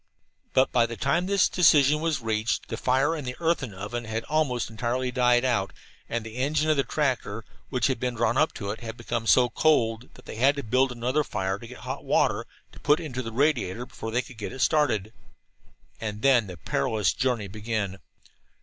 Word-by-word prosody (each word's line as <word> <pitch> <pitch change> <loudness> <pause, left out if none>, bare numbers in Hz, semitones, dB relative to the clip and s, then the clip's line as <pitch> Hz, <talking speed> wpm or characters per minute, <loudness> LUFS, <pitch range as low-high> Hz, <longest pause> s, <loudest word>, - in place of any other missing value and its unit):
But 130 0 +4
by 120 -2 +3
the 115 0 -7
time 170 +7 +1
this 200 -1 +3
decision 150 -4 +4
was 160 -4 0
reached 110 0 -1
the - - -3
fire 135 +7 +2
in 150 - -5
the 125 0 -5
earthen 165 -8 0
oven 105 +5 -5
had 110 +1 -3
almost 150 -6 0
entirely 125 +3 -2
died 125 -1 +3
out, 115 -7 0 0.4
and 115 -1 -2
the 115 +2 -8
engine 150 +4 +1
of 155 - +1
the 140 - +3
tractor, 125 -6 -2 0.2
which 125 -2 0
had 130 -3 +1
been 125 0 -2
drawn 115 0 +1
up 155 +3 +3
to 100 -5 -4
it, 110 - -6
had 115 -1 -7
become 120 -1 -3
so 125 +1 +6
cold 120 -4 +1
that - - -16
they - - -8
had 135 +4 +4
to 140 - -4
build 130 +4 +2
another 125 +5 0
fire, 95 -5 -2
to 115 - -10
get 125 - -10
hot - - -5
water - - +1 0.2
to - - -15
put 150 +1 +3
into 135 -7 -4
the 115 -2 -6
radiator, 120 -5 0
before 110 - -7
they 120 +3 0
could 120 -2 -13
get 105 - -5
it 130 - -6
started. 120 - +2 0.9
And 105 -1 -5
then 125 -6 +4
the 90 -2 -8
perilous 95 +8 0
journey 120 -4 -1
began. 105 -1 -3
125 Hz, 205 wpm, -26 LUFS, 110-140 Hz, 0.9 s, so